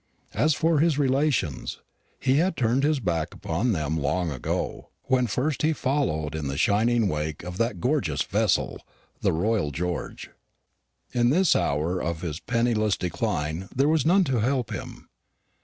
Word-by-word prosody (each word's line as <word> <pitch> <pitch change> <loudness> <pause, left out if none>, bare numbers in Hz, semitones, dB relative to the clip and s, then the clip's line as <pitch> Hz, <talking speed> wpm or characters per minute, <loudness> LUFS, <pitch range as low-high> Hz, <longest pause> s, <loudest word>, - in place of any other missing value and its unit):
As 155 -1 +2
for 160 -1 +2
his 160 -2 +3
relations, 135 - 0 0.4
he 135 +1 +2
had 175 +3 +1
turned 120 +2 +2
his 150 -1 +2
back 85 -6 -2
upon 100 +10 -1
them 80 -4 -1
long 90 +3 0
ago, 65 - -3
when 130 -2 +2
first 130 +7 -1
he 155 +1 +2
followed 130 - -1
in 80 -2 -3
the 70 0 -3
shining 110 +5 +2
wake 75 -2 -3
of 90 +1 -6
that 115 +1 0
gorgeous 100 - 0
vessel, - - 0 0.4
the - - +2
Royal 95 -1 0
George. 85 +4 -4 0.8
In 120 -1 +3
this 180 +6 +4
hour 80 +5 0
of 85 -1 -3
his 80 -2 -4
penniless 115 -3 +1
decline 85 0 -2
there 135 +3 +3
was 155 -2 +3
none 185 +4 +4
to 130 -7 0
help 125 0 0
him. - - -8
110 Hz, 155 wpm, -26 LUFS, 80-135 Hz, 0.8 s, this